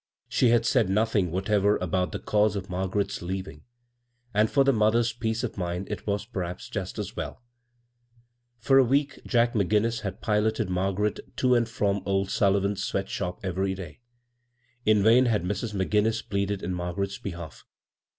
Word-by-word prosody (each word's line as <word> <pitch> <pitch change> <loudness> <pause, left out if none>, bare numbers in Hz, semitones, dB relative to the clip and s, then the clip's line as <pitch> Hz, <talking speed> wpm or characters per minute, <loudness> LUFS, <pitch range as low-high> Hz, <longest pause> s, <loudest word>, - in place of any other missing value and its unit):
She 125 - +3
had 115 -1 +3
said 115 -6 +3
nothing 105 -2 +2
whatever 100 +3 +2
about 90 -1 -1
the - - -3
cause 105 0 +1
of 95 -1 -5
Margaret's 95 +2 -1
leav 95 +1 -4
ing 75 - -11 0.4
— 120 0 -42
and 105 +1 +3
for 140 - +4
the 135 0 +3
mother's 115 +2 +2
peace 115 0 -2
oi 125 - -1
mind 90 +1 -3
it 105 -1 -5
was, 100 0 -1
pediaps, 90 -6 -5
just - - -4
as - - -5
welL - - -6 1.1
For 135 +3 +4
a - - +7
week 140 +3 0
Jack 120 -1 +2
McGimiis 110 +3 +1
had 100 0 -5
piloted 110 -1 0
Margaret 95 +3 0 0.2
to 125 -1 +3
and 120 -1 +2
from 100 -3 0
(^ 95 0 0
Sullivan's 100 0 +1
sweat 95 0 -2
shop 90 0 -4
every 95 +1 -1
day. 85 -6 -9 0.9
In 105 -2 +5
vain 120 +4 +6
had 105 -6 +1
Mrs. 105 +3 -3
McGinnis 105 +3 +1
pleaded 100 0 -1
in 90 - -2
Margaret's 90 +3 -3
behalf. 85 -5 -7
105 Hz, 170 wpm, -27 LUFS, 95-115 Hz, 1.1 s, a